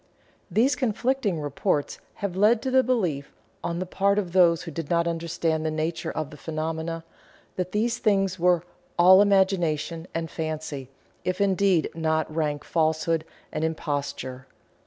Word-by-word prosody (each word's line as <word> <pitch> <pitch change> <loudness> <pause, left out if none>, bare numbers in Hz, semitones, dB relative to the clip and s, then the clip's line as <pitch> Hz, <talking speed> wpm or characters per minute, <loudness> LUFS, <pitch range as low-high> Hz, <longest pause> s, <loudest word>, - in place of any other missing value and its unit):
These 230 +10 +3
conflicting 235 - 0
reports 145 0 -1 0.2
have 200 -3 -4
led 215 +4 +4
to 260 - -1
the 260 0 +6
belief, 185 - -1 0.3
on 170 0 -2
the 185 - -2
part 200 +2 +1
of 185 -4 -1
those 170 -3 +5
who 165 - -7
did 160 0 -5
not 170 0 +2
understand 165 -1 -1
the 160 - 0
nature 155 +2 -2
of 155 -3 -4
the 150 - -10
phenomena, 160 +1 -3 0.5
that 185 0 -3
these 230 +3 0
things 195 -3 +1
were 175 -1 +3 0.3
"all 185 +2 +8
imagination" 175 -5 +1
and 165 -1 -3
fancy, 155 -4 -4 0.3
if 185 +1 -2
indeed 195 -3 +2
not 160 -1 -1
rank 150 -2 -1
falsehood 160 0 0 0.3
and 155 - -2
imposture. 145 -4 -3
170 Hz, 150 wpm, -26 LUFS, 155-195 Hz, 0.5 s, all